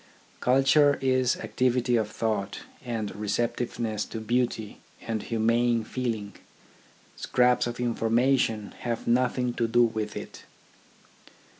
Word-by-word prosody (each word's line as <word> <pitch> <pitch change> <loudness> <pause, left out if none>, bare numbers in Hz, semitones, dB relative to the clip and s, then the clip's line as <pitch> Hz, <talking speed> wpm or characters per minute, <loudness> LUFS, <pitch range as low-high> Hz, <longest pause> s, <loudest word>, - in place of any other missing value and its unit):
Culture 140 +3 +4
is 130 -1 +2
activity 120 +2 0
of 110 -2 +1
thought, 105 -3 -2 0.2
and 115 -4 -4
receptive 105 +4 -2
ness 110 -3 -2
to 115 - -6
beauty, 115 -1 -2 0.2
and 110 -2 -2
humane 115 +1 +1
feeling. 110 -4 -3 0.8
Scraps 125 -1 +2
of 120 0 -5
information 115 -2 +1
have 120 -2 -3
nothing 125 0 +1
to 115 - 0
do 120 +1 +4
with 110 -2 -2
it. - - -9
120 Hz, 115 wpm, -27 LUFS, 110-125 Hz, 0.8 s, Culture